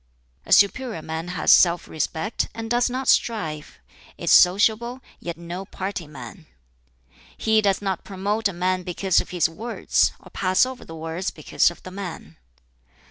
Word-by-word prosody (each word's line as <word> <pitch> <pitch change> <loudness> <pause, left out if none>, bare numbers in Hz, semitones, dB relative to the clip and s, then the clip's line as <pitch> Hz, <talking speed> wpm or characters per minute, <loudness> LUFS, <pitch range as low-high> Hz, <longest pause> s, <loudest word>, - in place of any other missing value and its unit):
"A - - -10
superior 210 -3 +3
man 160 +1 -5
has 180 - +2
self 175 -1 +5
respect, 160 +7 -2
and 225 0 -6
does 240 0 +2
not 255 +2 -4
strive; 155 - 0 0.4
is - - -1
sociable, 220 +7 +4 0.2
yet 170 -2 -6
no 170 +2 -6
party 190 -3 -5
man. 150 - -11 0.9
"He 220 -1 +3
does 200 -1 +1
not 190 -3 -2
promote 205 +3 -1
a - - -3
man 185 +1 0
because 180 +1 +1
of - - -10
his 175 -3 +2
words, 225 +9 0
or - - -16
pass 185 +4 +2
over 260 -1 -7
the 165 - -10
words 165 +3 -4
because 155 - +1
of 175 - -13
the 185 - -9
man." 180 - -8
185 Hz, 160 wpm, -23 LUFS, 170-215 Hz, 0.9 s, self